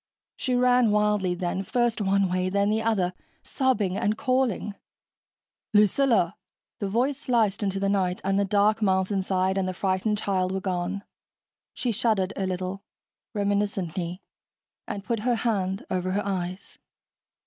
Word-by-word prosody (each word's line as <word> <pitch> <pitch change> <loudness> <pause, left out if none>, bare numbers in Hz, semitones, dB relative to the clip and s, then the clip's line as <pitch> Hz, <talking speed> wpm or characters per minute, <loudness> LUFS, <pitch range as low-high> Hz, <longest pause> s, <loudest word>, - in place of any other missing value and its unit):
She 255 -2 -1
ran 250 -1 +4
wildly 210 -3 +2
then, 175 +1 -2
first 240 +2 0
one 195 0 +2
way, 185 0 0
then 200 +2 +1
the 220 +1 +1
other, 200 -5 +1 0.3
sobbing 235 -9 0
and 210 0 0
calling. 255 -6 0 1.0
"Lucilla!" 210 -2 +4 0.4
The 200 - -2
voice 255 +6 +1
sliced 225 -7 +1
into 195 -1 -1
the 195 - 0
night, 190 -2 +1
and 195 +1 +1
the - - +3
dark 210 +2 +2
mountainside 190 -1 +1
and 185 - 0
the 185 - -3
frightened 195 +3 0
child 190 -3 0
were 190 - -1
gone. 185 +1 -2 0.7
She 245 - -1
shuddered 210 -3 +1
a 190 - -1
little, 185 +1 -3 0.5
reminiscently, 200 -4 -1 0.6
and 200 - -5
put 230 0 -1
her 240 +3 +1
hand 195 -5 -1
over 185 0 -1
her 205 +1 -1
eyes. 185 -1 -4
200 Hz, 145 wpm, -26 LUFS, 185-220 Hz, 1.0 s, ran